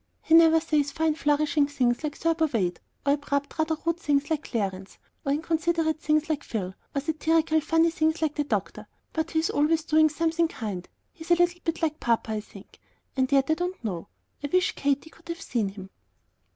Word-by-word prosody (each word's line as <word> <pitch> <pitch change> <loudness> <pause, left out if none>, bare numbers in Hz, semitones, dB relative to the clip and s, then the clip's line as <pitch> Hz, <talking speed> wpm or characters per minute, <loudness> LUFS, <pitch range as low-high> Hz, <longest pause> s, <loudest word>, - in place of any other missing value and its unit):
He 320 - 0
never 325 -1 +7
says 300 -3 +1
fine 320 0 +1
flourishing 295 -1 +2
things 250 -2 0
like 295 -1 -3
Thurber 330 -1 +1
Wade, 185 - -1 0.3
or 280 - +4
abrupt, 285 +1 -2
rather 315 0 +1
rude 335 0 0
things 290 0 0
like 315 -1 -1
Clarence, 195 -4 -3 0.3
or 275 - 0
inconsiderate 320 +1 0
things 305 0 +1
like 300 -3 -2
Phil, 190 -5 -4 0.2
or 280 - +1
satirical, 315 +1 +1
funny 325 +2 +3
things 320 -1 +1
like 315 -2 0
the 295 - -1
doctor; 290 - -3 0.3
but 320 0 -1
he's 320 0 0
always 310 +2 +2
doing 310 0 +4
something 330 +2 +1
kind. 205 - -6 0.2
He's 330 -3 -11
a 345 - +6
little 350 0 +1
bit 330 0 -2
like 310 -1 0
papa, 230 -1 0
I 215 -1 -2
think; - - -15 0.4
and 260 0 +1
yet 275 +1 +3
I - - +6
don't 355 -1 -3
know. 190 -4 -4 0.4
I 285 - -2
wish 365 0 +3
Katy 285 +3 -1
could 330 +1 -19
have 335 0 -4
seen 225 -5 -1
him." 195 -1 -10
310 Hz, 195 wpm, -26 LUFS, 275-325 Hz, 0.4 s, never